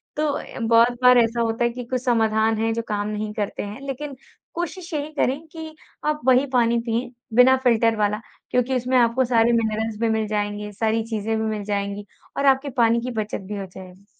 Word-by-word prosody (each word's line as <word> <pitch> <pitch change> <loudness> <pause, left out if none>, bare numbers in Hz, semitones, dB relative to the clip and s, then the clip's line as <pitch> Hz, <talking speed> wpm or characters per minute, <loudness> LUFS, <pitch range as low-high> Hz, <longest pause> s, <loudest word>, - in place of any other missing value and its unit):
तो 305 0 0
अ, 280 - -6
बहुत 230 +1 +4
बार 250 0 +7
ऐसा 235 0 +2
होता 225 +1 0
है 235 - +3
कि 245 +1 -6
कुछ 255 0 -2
समाधान 220 -2 +2
है 225 +1 0
जो 230 - -2
काम 205 -1 -2
नहीं 210 0 -4
करते 205 -2 -3
हैं 205 +5 -8
लेक़िन 275 +1 -5 0.4
कोशिश 345 +1 -5
यही 300 0 -3
करें 275 -1 0
कि 320 -1 -9 0.3
आप 300 0 0
वही 260 +1 +5
पानी 235 -1 +3
पिएँ 235 +2 -1 0.3
बिना 255 +1 +7
फ़िल्टर 230 -2 +3
वाला 210 0 0 0.3
क्योंकि 250 +1 +1
उसमें 255 +1 +1
आपको 240 +2 +3
सारे 235 -1 +3
मिनरल्स 220 -1 -1
भी 230 - +1
मिल 220 -1 0
जाएँगे, 210 0 -3
सारी 220 +2 0
चीज़ें 220 0 -2
भी 220 - -1
मिल 215 -2 -2
जाएँगी 200 0 -3 0.3
और 280 - 0
आपके 270 +1 +3
पानी 235 0 +3
की 250 +1 -4
बचत 210 -1 -5
भी 205 0 -5
हो 195 - -4
जाएगी। 185 +1 -13
230 Hz, 205 wpm, -23 LUFS, 215-255 Hz, 0.4 s, बार